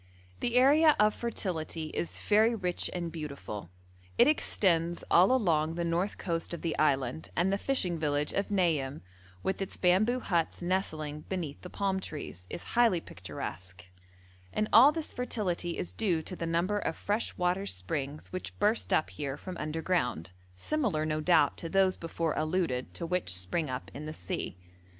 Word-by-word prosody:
The 240 - -1
area 295 +5 +6
of 210 0 +5
fertility 165 -8 -3
is 170 - -3
very 220 +3 +4
rich 180 -4 -1
and 170 -2 -3
beautiful; 140 - -6 0.5
it 240 - +7
extends 175 - +2
all 180 +7 +6
along 165 -10 +2
the 170 0 -1
north 170 +4 0
coast 170 -1 -2
of - - -11
the 165 - -1
island, 135 -1 +1
and 185 +3 +2
the - - +2
fishing 185 -12 0
village 150 -1 0
of 200 - -1
Nayim, 160 -8 +1 0.4
with 190 - -1
its 195 - -4
bamboo 205 +8 +3
huts 170 -8 0
nestling 155 -5 -2
beneath 170 -7 -4
the 180 - -8
palm 195 0 -1
trees, 145 - -7
is - - -6
highly 230 -7 +4
picturesque; 90 - -8 0.7
and 215 - 0
all 260 +6 +9
this 320 0 -3
fertility 185 -8 -2
is - - -4
due 180 -8 +1
to 185 - -6
the 165 - -3
number 175 +5 +1
of 160 - -2
fresh 210 +3 -1
water 180 +2 0
springs 135 - -3
which 185 - -5
burst 210 +2 +1
up 155 - +2
here 140 -2 -4
from 185 +3 -7
underground, 155 - -1 0.2
similar, 210 - 0
no 155 0 -1
doubt, 150 -3 +4
to 165 - -5
those 190 +1 +3
before 165 -1 -2
alluded 155 -6 -1
to 170 - -4
which 170 - 0
spring 100 - -1
up 130 0 -5
in 150 +2 -7
the 155 - -5
sea. 90 -2 -4
170 Hz, 170 wpm, -30 LUFS, 155-195 Hz, 0.7 s, all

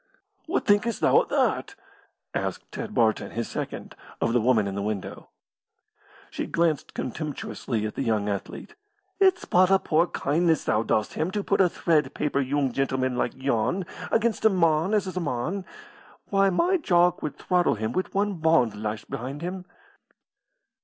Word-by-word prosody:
"What 345 - -1
thinkest 210 +3 +2
thou - - +4
o' - - -4
that?" - - 0 0.6
asked - - -4
Ted 215 -2 -6
Barton, 110 -3 +2
his 115 0 -2
second, - - -6 0.2
of 115 - 0
the 120 - +3
woman 115 -3 +3
in 100 - -3
the 100 - -3
window. 100 -2 -5 1.0
She - - -4
glanced 165 -4 0
contemptuously 130 -5 -4
at 110 - -4
the - - -4
young 110 -5 0
athlete. 100 -2 -5 0.5
"It's 380 -2 +3
but 185 +1 +4
a 195 - +6
poor 170 -1 +2
kindness 160 +1 +1
thou 105 - +1
dost 110 -1 0
him 160 - -1
to 205 +2 -2
put 200 - +2
a 180 - +4
thread 160 -3 +1
paper 140 -1 0
yoong 135 0 0
gentleman 130 -1 -1
like - - -1
yon 135 - 0 0.3
against 225 -1 +1
a 220 - +7
mon 170 0 +2
as 205 -3 +1
is 185 -1 -6
a - - +2
mon. 170 +6 -2 0.7
Why, 195 0 +4
my 350 - +2
Jock 175 - +2
would 150 - -4
throttle 180 -6 +1
him 110 +2 -3
wi' 185 - 0
one 200 -1 0
bond 140 -10 +2
lashed 105 0 -4
behind 135 +3 -5
him." 180 +1 -5
155 Hz, 170 wpm, -26 LUFS, 120-185 Hz, 1.0 s, a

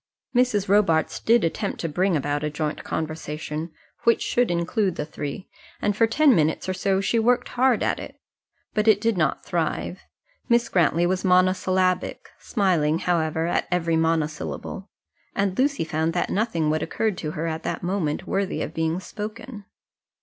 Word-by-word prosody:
Mrs. 240 -5 +2
Robarts 190 -5 +2
did 230 0 +3
attempt 195 +5 -2
to 165 - -1
bring 180 +2 +1
about 145 +1 -2
a 150 - 0
joint 150 0 -3
conversation, 155 0 -4 0.3
which 230 -1 +3
should 245 0 +1
include 175 +2 0
the 150 - -3
three, 150 +3 -6 0.3
and 205 -1 0
for 225 +2 +4
ten 280 +4 +4
minutes 160 -2 +1
or 185 - 0
so 190 +1 +1
she 230 +4 +1
worked 245 +2 +2
hard 250 -2 +2
at - - 0
it. - - -9 0.5
But 215 +1 0
it 215 -2 +6
did 225 0 +1
not 160 -4 0
thrive. - - -2 0.5
Miss 235 0 +3
Grantly 170 -1 +3
was 185 +1 0
monosyllabic, 185 0 +2
smiling, 170 -8 +1
however, 160 -2 0
at 175 - 0
every 170 -2 +1
monosyllable; 160 +4 -2 0.5
and 195 -2 0
Lucy 275 - +2
found 160 +1 -1
that 175 - -1
nothing 170 -8 0
would 155 0 0
occur 220 +5 0
to 165 -5 -5
her 160 - -3
at 160 -1 -3
that - - -4
moment 175 -5 -1
worthy 195 -1 -1
of - - -6
being 160 +2 -1
spoken. 210 +2 -7
180 Hz, 165 wpm, -24 LUFS, 160-210 Hz, 0.5 s, it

